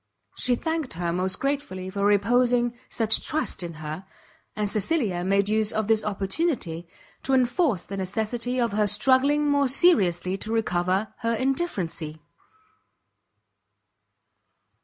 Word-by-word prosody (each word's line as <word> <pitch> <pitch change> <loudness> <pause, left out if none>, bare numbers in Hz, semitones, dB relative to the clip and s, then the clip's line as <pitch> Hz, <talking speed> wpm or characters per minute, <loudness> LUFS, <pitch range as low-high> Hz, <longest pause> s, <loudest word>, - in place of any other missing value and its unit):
She 250 - +1
thanked 320 0 -3
her 170 0 -2
most 185 +1 -1
gratefully 270 -10 -3
for 200 0 -2
reposing 240 +4 +3 0.2
such 220 -1 +2
trust 310 -8 -1
in 170 -2 -6
her; 155 +3 -6 0.5
and 210 -1 -1
Cecilia 210 - 0
made 195 +2 +2
use 215 0 +1
of 215 -1 -1
this 220 -1 +2
opportunity, 195 - -2 0.3
to 270 - +1
enforce 250 - +1
the 195 - -6
necessity 220 +6 -2
of 235 -2 +1
her 210 0 +1
struggling 275 +7 +3
more 285 -1 +3
seriously 195 - +3
to 215 +3 -6
recover 190 -2 0
her 230 -1 0
indifferency. 200 - -2
215 Hz, 125 wpm, -25 LUFS, 185-255 Hz, 0.5 s, reposing